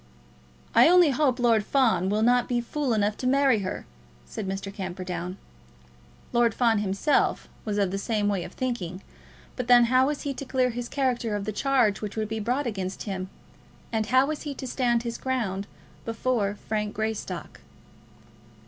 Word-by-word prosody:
"I 240 +7 +7
only 355 -4 +6
hope 265 -1 +2
Lord 230 -3 +3
Fawn 230 -7 +2
will 210 +2 +1
not 245 +1 +3
be 245 -1 +1
fool 260 +2 -1
enough 210 0 +1
to 255 - -2
marry 270 -3 +4
her," 185 -2 -4 0.4
said 195 - -6
Mr. 195 +1 -4
Camperdown. 185 -1 -5 1.0
Lord 235 -1 +3
Fawn 230 -3 +3
himself 200 +8 +1 0.2
was 210 -2 -2
of 200 -3 +1
the 195 - -2
same 210 0 0
way 195 -4 0
of - - -9
thinking; 195 -8 -3 0.5
but 250 -2 -4
then 245 -1 +7
how 260 +1 +5
was 295 0 -3
he 280 - -2
to 270 - -6
clear 255 -1 +1
his 240 +1 -5
character 245 -5 0
of 200 -1 -3
the 215 - -2
charge 245 -3 +2
which 210 -2 -5
would 215 -1 -2
be 220 0 -3
brought 250 +7 -1
against 195 -5 -4
him; 190 -2 -4 0.6
and 220 -2 0
how 260 +3 +4
was 305 +1 -3
he 290 -2 -5
to 265 - -6
stand 240 -2 +1
his 235 -1 -4
ground 210 -7 -2 0.4
before 225 -3 -1
Frank 210 -1 -2
Greystock? 215 -6 -4
230 Hz, 175 wpm, -26 LUFS, 200-255 Hz, 1.0 s, I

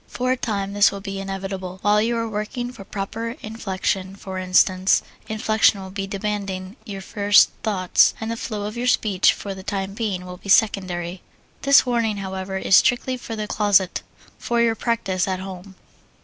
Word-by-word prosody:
For 255 +1 -1
a - - +3
time, 200 -5 -3
this 205 0 +5
will 200 - -6
be 195 0 -5
inevitable. 195 -1 -5
While 210 +1 +4
you 235 +2 0
are 230 0 -1
working 225 +3 -4
for 230 -5 -11
proper 220 +4 -5
inflection, 195 -3 -3
for 190 -1 -6
instance, 185 0 +3 0.3
inflection 215 -1 +3
will 190 -1 -8
be 195 0 -4
demanding 195 -1 -4
your 200 -4 -6
first 205 +1 +4
thoughts, 190 -5 +3
and 225 0 -3
the - - -2
flow 215 -2 -4
of 210 +2 -5
your 245 +1 -2
speech, 205 -6 +3
for 200 - -6
the 190 - -9
time 195 0 -3
being, 200 -4 -3
will 180 0 -8
be 200 - -11
secondary. 185 -4 +2 0.4
This 275 -1 +6
warning, 230 -4 0
however, 190 0 -4
is 190 - +3
strictly 255 +1 +2
for 235 -2 -6
the 215 -1 -3
closet, 205 -3 +2 0.4
for 240 0 -1
your 235 -1 +3
practise 205 -5 -1
at 185 -1 -1
home. 190 0 -9
200 Hz, 180 wpm, -22 LUFS, 190-220 Hz, 0.4 s, This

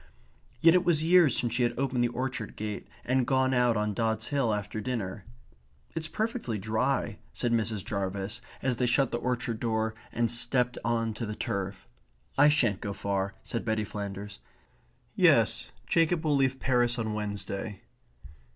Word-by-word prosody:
Yet 165 0 +7
it 180 0 +4
was 165 -3 +2
years 170 -4 +5
since 120 - 0
she 125 - 0
had 120 -1 +1
opened 130 -2 +1
the - - +3
orchard 125 -2 -4
gate 105 -1 -5 0.2
and 130 0 +1
gone 130 0 +2
out 125 -2 +3
on 105 0 0
Dods 110 0 -1
Hill 140 -6 +1
after 105 +1 -3
dinner. 105 -6 -4 0.7
"It 165 - -2
is 160 - -3
perfectly 220 - -2
dry," 110 +2 -1
said 120 - -1
Mrs. 110 -3 0
Jarvis, 100 -1 -3 0.2
as 130 -2 +1
they 125 - +1
shut 125 +2 +2
the 120 - -1
orchard 120 -2 -2
door 110 -1 0 0.2
and 115 -1 +1
stepped 120 +1 +2
on 115 -1 0
to 110 +1 -4
the 105 - -4
turf. 100 -1 -4 0.5
"I 145 +2 +6
shan't 120 -10 +2
go 100 - -3
far," 100 0 -2
said 115 - -3
Betty 110 -1 0
Flanders. 100 0 -6 0.8
"Yes, - - +4 0.2
Jacob 165 0 +2
will 150 -2 +3
leave 135 -1 +2
Paris 120 -2 +2
on 110 -2 -2
Wednesday." 100 -1 -4
115 Hz, 170 wpm, -29 LUFS, 105-130 Hz, 0.8 s, Yet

